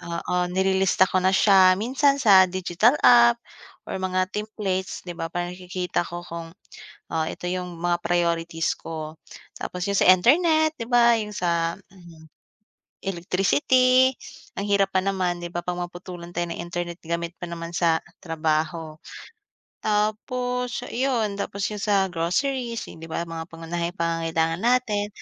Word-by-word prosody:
oo, 170 +1 -4
nilista 190 +1 +2
ko 185 0 0
na 190 +1 +3
siya 190 -2 +6
minsan 265 +7 +2
sa 195 -5 +7
digital 185 - +2
app 235 -1 +7 0.5
or - - -3
mga 185 0 -1
templates, 205 -3 -3
'di 175 - -6
ba, 165 - -4
para 175 0 -2
nakikita 180 0 -3
ko 175 +1 -6
kung, 165 -1 -7 0.6
ah, 160 -1 0
ito 175 - -5
'yong 180 -1 -4
mga 175 0 -1
priorities 170 -1 0
ko. 155 -1 -7 0.4
Tapos 180 +1 -5
'yong 200 - 0
sa 185 - +7
internet, 315 - +4
'di 230 - -6
ba, 235 -1 +6
'yong 210 -2 -3
sa, 170 -3 -1
ah, 195 - -24
um, 170 -3 -15 0.7
electricity. 195 - +3 0.4
Ang 200 +1 -4
hirap 200 -1 +2
pa 185 - +3
naman, 185 -2 -1
'di 175 - -5
ba, 175 0 -5
pag 180 - -1
maputulan 175 0 -7
tayo 175 -1 -3
ng - - -6
internet 175 0 -5
gamit 170 +1 -3
pa 175 - -5
naman 170 0 -6
sa 165 -1 +2 0.2
trabaho. 160 -1 -2 0.9
Tapos 245 +4 -1
'yon 240 -5 0
tapos 200 0 -3
'yong 210 - -5
sa 200 -2 +3
groceries, 235 +8 -1
yung - - -14
'di 165 - -9
ba, 170 - -2
mga 165 0 -7
pangunahing 170 +2 -4
pangangailangan 165 0 -1
natin, 225 -3 +1
180 Hz, 150 wpm, -24 LUFS, 170-210 Hz, 0.9 s, sa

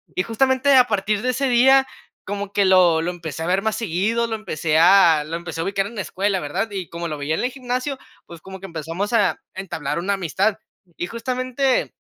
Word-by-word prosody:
Y, 185 - +1
justamente 260 +4 +2
a 255 - +8
partir 210 -2 -1
de 255 - -1
ese 270 +2 0
día 265 +2 +5 0.4
como 200 0 -5
que 200 - +3
lo 180 -4 +5
lo 170 - -2
empecé 165 -4 -6
a 165 - -3
ver 190 +2 +1
más 220 -1 0
seguido, 225 +4 -1
lo 225 - -3
empecé 160 -7 -1
a 165 -3 +6
lo 160 +2 -5
empecé 165 -1 -5
a - - -1
ubicar 195 +1 -1
en 230 - -11
la 205 - -2
escuela, 195 +1 -1
¿verdad? 180 +8 -3
Y 190 -4 -5
como 170 0 -5
lo 155 -2 -5
veía 145 +2 -2
en - - -2
el 250 - +1
gimnasio, 255 +1 -3 0.3
pues, 170 - -11
como 190 +2 -10
que 195 - -8
empezamos 165 +6 -4
a 230 - +2 0.2
entablar 185 -5 -4
una 185 +4 -1
amistad. 195 +3 0 0.4
Y 175 - -3
justamente, 255 +3 -1
195 Hz, 220 wpm, -21 LUFS, 170-235 Hz, 0.4 s, a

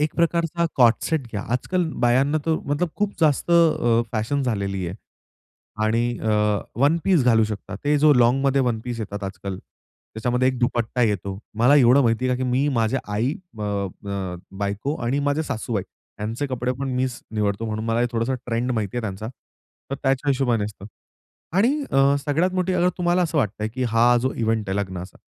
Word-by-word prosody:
एक 150 +1 0
प्रकारचा 170 0 +1
cord 120 -3 +6
set 155 -6 -1
घ्या. 105 -2 -3
आज-काल 175 +7 0 0.2
बायांना 135 +5 +3
तो 160 -1 +1
मतलब 145 +5 0
खूप 205 0 0
जास्त 155 +1 +2
अ, 155 -9 +4
फॅशन 115 +6 -1
झालेली 100 -6 -2
आहे. 85 - -5 0.9
आणि 115 +2 0
अ, 105 -1 +1 0.2
वन 145 +4 +4
पीस 175 -10 +3
घालू 115 -3 +4
शकता, 105 -1 -6
ते 145 +1 +3
जो 150 +1 +6
लाँगमध्ये 135 +3 +3
वन 120 -3 0
पीस 120 -2 -4
येतात 100 -1 -5
आज-काल, 95 0 -5
त्याच्यामध्ये 125 +6 -3
1 130 -1 -2
दुपट्टा 120 0 0
येतो. 100 -3 -1 0.2
मला 125 +5 +5
एवढं 130 0 +6
माहिती 115 +1 +1
आहे, 125 - +1
का 130 - -3
की 130 - -1
मी 135 +4 +2
माझ्या 115 +3 +1
आई 120 +7 +1 0.3
अ, 105 - -4
अ, 100 -2 -4 0.2
बायको 100 +8 -2
आणि 125 +4 0
माझे 145 +2 +1
सासूबाई, 115 -7 -3 0.4
यांचे 115 +7 -2
कपडेपण 130 +1 -3
मीच 130 -1 -1
निवडतो. 105 0 -1
म्हणून 110 0 -3
मला 115 +1 0
हे 120 - +3
थोडासं 115 +3 0
ट्रेंड 120 +1 -1
माहिती 110 -1 -2
आहे - - 0
त्यांचा, 105 0 -5 0.6
तर - - -1
त्याच्या 135 +1 +1
हिशोबाने 125 -5 +1
असतं. 100 -1 -8 0.7
आणि 220 +6 +4 0.2
अ, 135 +1 +4
सगळ्यात 165 +6 +1
मोठी 185 0 0
अगर 180 0 +3
तुम्हाला 175 0 +2
असं 160 -2 0
वाटतं 110 -7 +1
आहे - - 0
की 130 - -1
हा 115 +2 +4
जो 130 - 0
इव्हेंट 110 -2 -1
आहे 95 - -1
लग्नाचा. 95 -2 -5
120 Hz, 185 wpm, -23 LUFS, 110-140 Hz, 0.9 s, cord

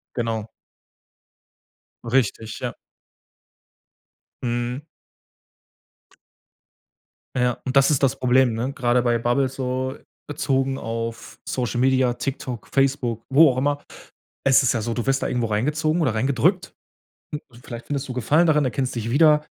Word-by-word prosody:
Genau. 115 -3 -2 1.6
Richtig, 115 -2 0
ja. - - -3 1.7
Mhm. 120 +2 -2 2.5
Ja, 125 -1 +2
und 130 +1 -3
das 135 +1 +6
ist 145 -2 +1
das 135 0 +2
Problem, 130 -1 +3
ne? 120 +5 -2
Grade 125 -2 +1
bei 120 -1 +2
Bubbles 130 +3 0
so 130 0 -2 0.3
bezogen 135 -2 0
auf 115 0 -5
Social 120 -1 -1
Media, 130 -1 +3
TikTok, 125 -2 -5
Facebook, 130 -4 0
wo 150 +2 +7
auch 125 - -2
immer. 145 +2 0 0.6
Es 135 0 +5
ist 125 - +3
ja 115 - -1
so: 115 +2 -2
Du 120 +1 -3
wirst 135 0 +1
da - - 0
irgendwo 120 -2 0
reingezogen 150 +10 0
oder 130 -8 +1
reingedrückt. 125 +2 +1 0.7
Und 120 +1 -18
vielleicht 120 -1 -8
findest 140 -1 -3
du 130 - -4
Gefallen 150 +8 +3
daran, 150 -2 +3
erkennst 130 0 -1
dich 115 -1 -3
wieder. 150 +2 +5
130 Hz, 135 wpm, -23 LUFS, 120-135 Hz, 2.5 s, wo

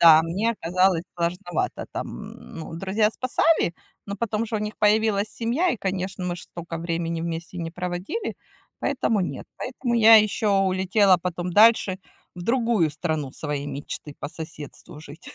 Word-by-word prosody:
Да, 160 -1 +9
мне 190 +8 0
оказалось 185 -3 +2
сложновато 175 0 -2
там. - - -6
Ну, 160 0 -9
друзья 195 +5 +1
спасали, 255 - +2 0.3
но 200 0 -4
потом 220 +1 -1
же 225 0 -2
у - - -1
них 210 +1 -4
появилась 210 -1 +3
семья. 250 +13 0
И, - - -1
конечно, 190 -2 -3
мы 175 -1 -2
ж - - -10
столько 170 -1 -7
времени 165 0 -2
вместе 170 +2 -5
не 165 -1 -3
проводили, 180 - -4 0.5
поэтому 235 -6 +1
нет. 175 -7 -4
Поэтому 250 -1 -3
я 225 -1 +8
ещё 210 -1 +3
улетела 190 +1 +4
потом 175 0 -4
дальше 210 -2 +5 0.4
в 175 - -6
другую 230 -6 +2
страну 155 -3 -3
своей 145 -2 -4
мечты 145 +1 -6
по 145 - -3
соседству 155 -2 -9
жить. 155 +3 -12
185 Hz, 155 wpm, -24 LUFS, 165-215 Hz, 0.5 s, Да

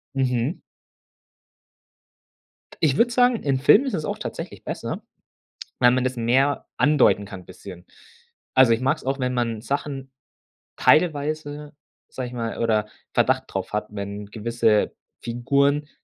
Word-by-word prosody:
Mhm. 130 +3 0 2.2
Ich 150 -5 +3
würde 240 +5 +3
sagen, 245 0 +4
in 135 -2 +1
Filmen 205 - +6
ist 260 - -2
es 155 - -2
auch - - -3
tatsächlich - - -7
besser, - - -5 0.8
weil 125 -1 +6
man 125 0 +1
das 130 0 -1
mehr 130 +5 +1
andeuten 145 -8 +4
kann 95 -2 -9
bisschen. 90 0 -12 0.7
Also 130 -3 +6
ich 115 - +1
mag 130 +1 +2
es - - -14
auch, 135 +1 -1
wenn 125 -1 -1
man 115 -3 -1
Sachen 135 0 -4 0.6
teilweise, 150 -2 +1 0.3
sage 130 -1 -5
ich 125 - -10
mal, 115 -2 -4
oder 110 -2 +1 0.3
Verdacht - - +2
drauf - - -4
hat, 105 0 -2
wenn 100 0 -6
gewisse 110 0 +1 0.3
Figuren 140 +5 +1
130 Hz, 140 wpm, -23 LUFS, 115-145 Hz, 2.2 s, Filmen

